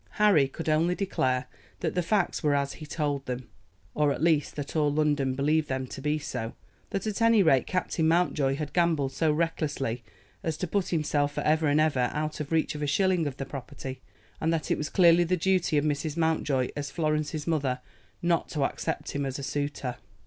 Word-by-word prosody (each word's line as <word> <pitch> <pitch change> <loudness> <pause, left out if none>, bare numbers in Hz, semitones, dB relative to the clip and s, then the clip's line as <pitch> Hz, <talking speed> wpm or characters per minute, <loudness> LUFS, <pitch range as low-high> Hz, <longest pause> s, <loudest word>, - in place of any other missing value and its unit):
Harry 200 -10 +5
could 160 +5 -7
only 160 +3 +2
declare 130 -10 0 0.4
that 160 - -1
the 180 - +1
facts 195 +1 0
were 150 -3 +2
as 140 0 0
he 155 - -10
told 145 -2 -1
them, 125 -1 -4 0.5
or 150 -1 +2
at - - -2
least 155 -3 +2
that 145 +1 -5
all 150 -2 +3
London 145 -3 +1
believed 150 +3 +1
them 130 0 -1
to 130 - -8
be 150 +2 +1
so, 115 -6 -5 0.3
that 195 -1 -3
at 215 +1 -2
any 230 -3 +5
rate 135 -6 +4
Captain 180 -3 0
Mountjoy 160 -5 +2
had 150 0 -5
gambled 165 -6 +2
so 155 +3 +1
recklessly 150 -6 -1 0.4
as 160 -2 -2
to 180 - -2
put 190 +2 -1
himself 145 -3 0
for - - -2
ever 155 +1 +2
and 145 +1 +3
ever 140 -6 +2
out 155 0 -2
of 150 0 -5
reach 160 0 +1
of 150 - -6
a 145 - 0
shilling 180 +2 +2
of 135 -1 -5
the 135 - -4
property, 130 -1 -7 0.4
and 160 - +1
that 160 -2 -1
it - - +2
was 150 - -2
clearly 175 -1 +5
the 180 +2 +1
duty 180 -3 +2
of 145 - +2
Mrs. 150 +1 -1
Mountjoy, 155 -6 +1
as 145 -1 -3
Florence's 155 -1 -1
mother, 140 -6 0 0.4
not 170 -1 +1
to 150 -3 -1
accept - - -2
him 140 - -2
as 135 -1 -3
a 140 - -6
suitor. 145 -3 -3
150 Hz, 205 wpm, -28 LUFS, 140-165 Hz, 0.5 s, Harry